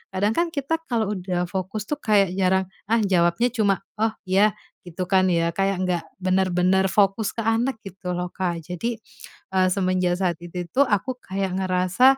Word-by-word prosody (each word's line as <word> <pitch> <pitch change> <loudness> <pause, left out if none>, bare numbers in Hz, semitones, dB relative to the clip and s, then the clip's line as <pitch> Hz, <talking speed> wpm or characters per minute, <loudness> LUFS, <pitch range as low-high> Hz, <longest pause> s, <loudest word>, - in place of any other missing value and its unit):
kadang 205 +3 +2
kan 345 - +3
kita 295 +3 -1
kalau 220 -4 0
udah 180 -1 -2
fokus 190 +3 -3
tuh 295 - -2
kayak 200 -6 +3
jarang 190 0 +3 0.2
ah 230 0 +3
jawabnya 180 +4 +2
cuma, 200 -5 +1 0.2
"oh 220 0 +2
ya" 200 +3 +4 0.3
gitu 180 +2 -4
kan 190 -1 +4
ya, 170 0 +2
kayak 195 +1 0
nggak 175 -2 -1 0.2
benar-benar 185 0 +2
fokus 200 +1 +2
ke 230 - -2
anak 225 +3 +1
gitu 190 -2 -6
loh 180 0 -3
Kak. 175 -3 -2
Jadi, 180 +8 -3 0.6
eee, 185 0 +4
semenjak 185 -2 +1
saat 175 -4 0
itu 175 0 -5
tuh 280 0 +3
aku 215 +5 0
kayak 190 0 -3
ngerasa, 185 +9 +4
190 Hz, 175 wpm, -24 LUFS, 180-215 Hz, 0.6 s, ya